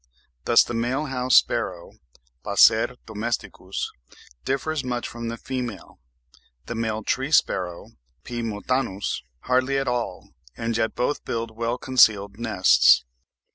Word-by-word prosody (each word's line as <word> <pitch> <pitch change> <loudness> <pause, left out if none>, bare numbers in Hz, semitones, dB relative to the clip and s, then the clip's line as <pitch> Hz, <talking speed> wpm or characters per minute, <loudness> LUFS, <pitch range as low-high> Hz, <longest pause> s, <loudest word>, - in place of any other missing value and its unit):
Thus 120 - +6
the - - -6
male 125 +6 -1
house 130 -2 +1
sparrow 95 -7 +2 0.5
(Passer 115 +3 +4
domesticus) 110 +2 -4 0.5
differs 140 +2 -1
much 125 -1 -3
from 115 0 -6
the 115 0 -4
female, 125 -6 -6 0.7
the - - -5
male 110 -1 -2
tree 135 +6 -1
sparrow 90 - +1 0.3
(P. 120 -1 -5
montanus) 110 - -2 0.2
hardly 130 +2 +1
at 135 - -1
all, 120 -6 -3 0.3
and 115 0 -2
yet 110 -1 0
both 135 +4 -1
build 115 -1 -4
well 115 +2 -2
concealed 110 -6 +3
nests. 105 - +4
115 Hz, 125 wpm, -24 LUFS, 110-125 Hz, 0.7 s, Thus